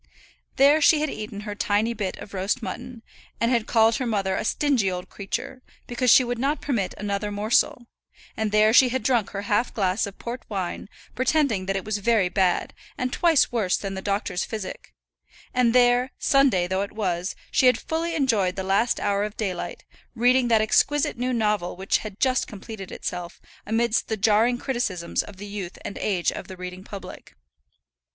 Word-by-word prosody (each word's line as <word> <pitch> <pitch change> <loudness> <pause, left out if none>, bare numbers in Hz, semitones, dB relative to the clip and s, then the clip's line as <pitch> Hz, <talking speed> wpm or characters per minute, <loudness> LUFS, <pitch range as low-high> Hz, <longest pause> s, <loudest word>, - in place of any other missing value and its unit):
There 285 +3 +5
she 305 +1 +5
had 305 - -1
eaten 210 -1 -6
her 210 0 -5
tiny 205 +3 0
bit 205 -4 -4
of 200 - -11
roast 200 +6 -1
mutton, 245 -1 -7 0.4
and 230 +1 +1
had 235 -2 +1
called 225 0 +4
her 260 - -2
mother 195 -4 0
a - - -2
stingy 250 -4 +1
old 180 0 -5
creature, 200 +5 -5 0.2
because 245 +1 0
she 255 - +8
would 245 -1 -3
not 280 +3 0
permit 230 -10 -2
another 205 0 -2
morsel; 215 +3 +1 0.5
and 220 -1 -1
there 215 +1 +4
she 255 +1 +7
had 260 -1 -2
drunk 235 -4 +1
her 200 0 -5
half 205 +4 +1
glass 195 0 +1
of 200 - -10
port 240 +2 -6
wine, 195 -1 -4 0.2
pretending 255 -6 +1
that 195 - 0
it 195 - -3
was 210 -1 -2
very 210 -3 +2
bad, 185 -1 +1 0.2
and 250 0 -2
twice 335 -5 +3
worse 210 -6 +1
than 195 -1 -5
the 190 - -5
doctor's 195 -2 -1
physic; 195 - -7 0.6
and 250 -2 +3
there, 245 +1 +4
Sunday 275 - +3
though 190 +2 -1
it 200 - -4
was, 185 -4 -2 0.2
she 260 - +4
had 250 - +5
fully 330 +1 -3
enjoyed 220 - +1
the 190 - -3
last 195 +5 +1
hour 200 0 0
of 210 0 -5
daylight, 195 -5 -4 0.3
reading 250 +1 +3
that 225 -2 +4
exquisite 285 +6 +2
new 250 +2 -2
novel 210 -6 0
which 190 +2 0
had 210 -2 -8
just 260 -1 +2
completed 205 -1 -9
itself, 175 -1 -5 0.3
amidst 225 +1 +1
the 220 - -2
jarring 220 +4 +3
criticisms 225 -10 -2
of 195 - -12
the 205 - -8
youth 200 -3 -6
and - - -6
age 185 -4 0
of - - -7
the 190 - -9
reading 180 +1 -7
public. 200 -1 -10
215 Hz, 190 wpm, -24 LUFS, 195-245 Hz, 0.6 s, she